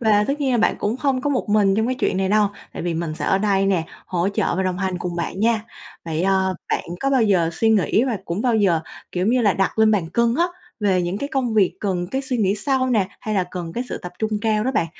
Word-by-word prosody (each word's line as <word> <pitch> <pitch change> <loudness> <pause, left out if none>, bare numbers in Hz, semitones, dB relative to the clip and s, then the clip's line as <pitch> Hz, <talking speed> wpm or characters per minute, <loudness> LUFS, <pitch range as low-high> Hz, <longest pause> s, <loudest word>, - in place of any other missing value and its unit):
và 210 -3 +3
tất 290 +2 -1
nhiên 270 -2 +1
là 240 - +2
bạn 225 - +3
cũng 210 +4 -1
không 265 -2 0
có 290 +2 -1
một 255 -5 -1
mình 205 -2 +3
trong 220 +1 +1
cái 255 - 0
chuyện 255 - 0
này 190 0 0
đâu 210 0 +3 0.2
tại - - -6
vì 170 -1 -1
mình 165 -1 -3
sẽ - - -5
ở 190 - +2
đây 195 -1 +2
nè, 185 -4 +1 0.2
hỗ 180 +1 0
trợ 195 -5 0
và 190 - +1
đồng 185 0 -1
hành 190 -2 -2
cùng 175 -1 -4
bạn 185 +3 -3
nha. 225 -1 +2 0.4
Vậy, 165 0 -2
ờ, 190 0 +2
bạn - - -1 0.2
có 275 - +1
bao 265 -3 +3
giờ 185 -6 +2
suy 225 +5 +2
nghĩ 220 +2 +3
và 235 -6 -1
cũng 175 +6 -3
bao 245 -2 +2
giờ, 185 -6 +3 0.3
kiểu 180 0 -1
giống - - +3
như 250 -1 +2
là, 205 -3 +4
đặt 195 +3 -1
lên 220 0 +5
bàn 190 -6 +1
cân 235 +4 +2
á, 340 - +4 0.4
về 190 -3 +2
những 175 +3 -2
cái 280 - -3
công 255 -5 -1
việc 200 -4 +3
cần 180 -4 -1
cái 265 - -1
suy 260 -2 -2
nghĩ 200 -4 +2
sâu 260 +3 0
nè, 205 -5 +2
hay 215 -1 -3
là 185 - +2
cần 170 -2 -5
cái 245 +6 -3
sự - - -4
tập 180 - -8
trung 220 0 -1
cao 215 -1 +1
đó 260 - +1
bạn 170 - +1
205 Hz, 290 wpm, -22 LUFS, 185-235 Hz, 0.4 s, lên